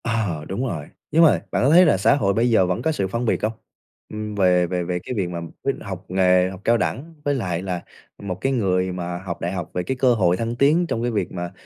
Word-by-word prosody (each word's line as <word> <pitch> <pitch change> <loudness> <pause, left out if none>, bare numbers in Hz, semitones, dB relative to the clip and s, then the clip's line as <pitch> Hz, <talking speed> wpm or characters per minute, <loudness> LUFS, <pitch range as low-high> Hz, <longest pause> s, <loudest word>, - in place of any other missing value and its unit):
Ờ, 105 -10 -1
đúng 100 +8 -2
rồi, 80 -10 -4 0.3
nhưng 165 +3 +5
mà 160 - +7 0.2
bạn - - +1
có 135 - +4
thấy 175 +4 +7
là 150 - +4
xã 100 - +4
hội 100 -8 +1
bây 115 +4 +2
giờ 110 -5 +4
vẫn 90 +5 -1
có 160 - +1
sự 100 -11 -1
phân 115 +5 -2
biệt 110 - 0
hông? 110 - +1 0.6
Ừm, 105 0 -5
về 90 -3 +3
về 90 0 -2
về 90 +1 -2
cái 125 - -5
việc 95 -4 -1
mà 85 -1 -4 0.2
quyết - - +1
học - - -7
nghề, 90 0 +3
học 95 0 -9
cao 115 0 +3
đẳng 150 +9 -3
với 145 - +2
lại 90 -9 -2
là 90 -2 -3 0.4
một 95 -2 -3
cái 135 - +1
người 95 -7 +1
mà 90 -1 -4
học 90 -1 -6
đại 85 - -2
học 90 -4 -4
về 90 - -1
cái 130 +7 -3
cơ 125 -1 +4
hội 90 -5 +2
thăng 115 +2 -2
tiến 155 +7 +3
trong 115 - -2
cái 120 0 -1
việc 100 -5 -2
mà 85 -1 -5
95 Hz, 270 wpm, -22 LUFS, 90-120 Hz, 0.6 s, mà